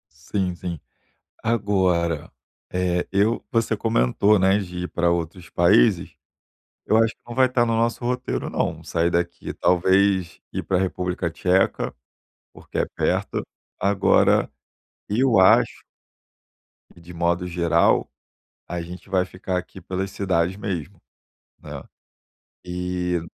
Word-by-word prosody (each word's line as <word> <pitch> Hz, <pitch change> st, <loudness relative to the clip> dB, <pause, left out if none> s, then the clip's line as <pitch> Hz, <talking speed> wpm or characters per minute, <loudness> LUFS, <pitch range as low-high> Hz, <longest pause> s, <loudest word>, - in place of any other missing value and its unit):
Sim 90 Hz, +3 st, -2 dB
sim. 85 Hz, -2 st, -6 dB, 0.6 s
Agora, 95 Hz, -8 st, +1 dB, 0.4 s
eh, 90 Hz, -1 st, 0 dB
eu 100 Hz, +4 st, +1 dB
você 115 Hz, -1 st, +1 dB
comentou, 105 Hz, -, +2 dB
né, 95 Hz, +1 st, +4 dB
de 90 Hz, -2 st, -5 dB
ir -, -, -3 dB
para 85 Hz, 0 st, +1 dB
outros 85 Hz, +1 st, -3 dB
países. -, -, +3 dB, 0.7 s
Eu 110 Hz, -, +3 dB
acho 115 Hz, 0 st, +3 dB
que -, -, -50 dB
não 120 Hz, -, -7 dB
vai 130 Hz, -, +5 dB
estar 125 Hz, -1 st, +2 dB
no 115 Hz, -, 0 dB
nosso 115 Hz, +1 st, 0 dB
roteiro 125 Hz, +1 st, -2 dB
não, -, -, -2 dB
sair 85 Hz, 0 st, 0 dB
daqui 85 Hz, 0 st, -2 dB
talvez 95 Hz, 0 st, +2 dB
ir -, -, -3 dB
para 95 Hz, -, 0 dB
República 90 Hz, -1 st, -2 dB
Tcheca, 90 Hz, +3 st, +1 dB, 0.6 s
porque -, -, -8 dB
é -, -, +2 dB
perto, -, -, 0 dB, 0.4 s
agora, 100 Hz, -1 st, +3 dB, 0.6 s
eu 120 Hz, 0 st, +3 dB
acho 95 Hz, -, +4 dB, 1.1 s
e -, -, -15 dB
de 85 Hz, +1 st, -12 dB
modo 85 Hz, +1 st, 0 dB
geral, 85 Hz, -1 st, +2 dB, 0.6 s
a 90 Hz, -1 st, -4 dB
gente 90 Hz, +3 st, -10 dB
vai 95 Hz, -1 st, +2 dB
ficar 90 Hz, 0 st, -4 dB
aqui 90 Hz, +1 st, -7 dB
pelas 95 Hz, +1 st, -4 dB
cidades 90 Hz, -2 st, 0 dB
mesmo, 95 Hz, -3 st, -5 dB, 0.6 s
né, -, -, -8 dB, 0.8 s
e. 90 Hz, 0 st, -2 dB
90 Hz, 130 wpm, -23 LUFS, 85-100 Hz, 1.1 s, vai